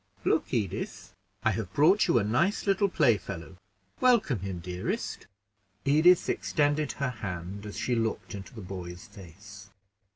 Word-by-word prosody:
"Look, - - +1
Edith, 105 -6 -3 0.3
I - - +3
have 90 - -4
brought 180 +9 +5
you - - +4
a 115 - +3
nice 130 - +1
little 200 0 +2
playfellow. 100 - 0 0.4
Welcome 235 - +3
him, 95 -1 -4
dearest." 90 +1 -4 0.6
Edith 160 +6 +5
extended 145 -1 +1
her 140 -2 -2
hand 100 -2 -6
as 105 - -7
she 125 - -1
looked 115 -1 -1
into 100 +6 -9
the 110 - -7
boy's 90 -2 -7
face. 100 +1 -13
105 Hz, 140 wpm, -28 LUFS, 95-145 Hz, 0.6 s, brought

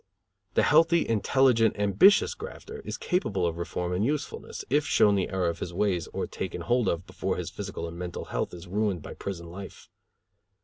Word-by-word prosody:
The - - +4
healthy, 165 +3 +4
intelligent, 115 0 +3
ambitious 105 - +5
grafter 440 +1 -9
is - - -6
capable 100 - 0
of 85 0 -2
reform 90 +1 -3
and 90 +3 0
usefulness, 145 +4 -3
if 145 +3 +2
shown 105 -8 +4
the 95 -2 0
error 95 -3 0
of 85 0 -4
his 85 - -5
ways 90 -4 0
or - - -3
taken - - -5
hold 120 -1 +1
of 85 +1 -1
before - - -3
his - - -4
physical 85 - -5
and 85 +1 -8
mental 90 -1 -5
health - - -1
is 90 +1 -9
ruined 100 -3 -1
by - - -7
prison 90 -4 -6
life. 95 +2 -10
100 Hz, 185 wpm, -28 LUFS, 90-125 Hz, -, ambitious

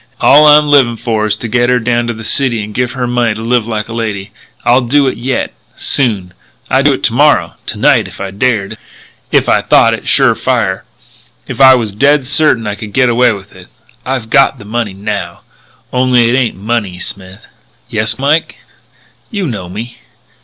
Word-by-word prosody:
All 150 +2 +6
I'm 150 0 +6
livin' 135 -5 +3
for 110 -2 -1
is 105 - +1
to 120 - -6
get 120 +1 +1
her 125 - +3
down 120 0 -1
to 120 - -2
the 110 - -9
city 120 -1 -1
and 105 +1 -9
give 125 +2 -2
her 130 -2 -3
money 120 -2 0
to 110 - -7
live 120 -1 0
like 110 -2 -3
a 115 - -8
lady. 105 -4 -4 0.3
I'll 125 +2 +4
do 140 +4 +2
it 130 - -1
yet.... 125 +3 -3 0.2
Soon!... 105 -10 -1 0.4
I'd - - +2
do - - +4
it - - -6
to - - +2
morrow - - +2
to - - -3
night - - +3
if - - -13
I 100 -1 -5
dared.... 105 -1 -1 0.5
If - - +2
I - - +3
thought - - +3
it - - -6
sure - - +4
fire.... 95 0 -1 0.6
If - - -5
I 130 -1 +8
was 115 -4 -2
dead 140 +6 +2
certain 140 -4 +1
I 105 - -2
could 105 0 -9
get 130 -2 +3
away 120 +1 +3
with 100 -2 -9
it.... 90 -1 -14 0.4
I've 130 -3 -4
got 135 0 +3
the 105 - -13
money. 110 -1 -3
Now!... 100 -4 -5 0.5
Only 125 -2 +2
it 120 - +1
ain't 130 -3 0
in 100 - -14
money.... 105 -6 -2
Smith?" 95 +1 -8 0.4
"Yes, 110 +1 -2
Mike." 145 +4 0 0.7
"You 205 -5 -3
know 100 - -5
me?" 115 +6 -8
120 Hz, 205 wpm, -12 LUFS, 105-130 Hz, 0.7 s, I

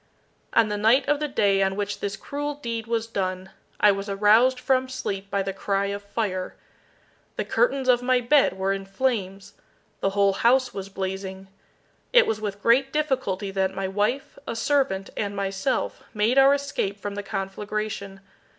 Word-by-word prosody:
On 225 -2 +4
the 210 - -2
night 225 +6 +4
of 295 0 +2
the 300 - -1
day 200 -7 +2
on 190 0 +1
which 205 0 -3
this 200 0 -3
cruel 290 +1 -4
deed 230 -5 -5
was 230 -1 0
done, 185 -4 -3 0.3
I 210 - +6
was 195 +1 -4
aroused 215 +6 +4
from 260 0 +1
sleep 200 -6 -4
by 200 -1 0
the 195 0 -3
cry 195 0 -1
of 200 - -5
fire. 200 -3 -3 0.8
The - - -2
curtains 275 - +1
of 245 -1 +4
my 255 0 +3
bed 265 +1 +3
were 190 +1 0
in 195 0 -4
flames. 195 -3 -2 0.5
The 195 - +1
whole 200 0 +2
house 250 +5 +3
was 195 0 -6
blazing. 190 0 -5 0.6
It - - +7
was 215 -1 -2
with 205 -1 -5
great 265 +4 +4
difficulty 260 -10 -1
that 190 0 -1
my 195 0 -2
wife, 210 +8 -1
a - - -3
servant, 245 -6 0
and 205 -1 -3
myself, 195 +5 -2
made 220 +6 +3
our 275 +1 +6
escape 280 -8 -3
from 205 +1 -5
the 205 - -4
conflagration. 200 0 -4
205 Hz, 175 wpm, -25 LUFS, 195-255 Hz, 0.8 s, It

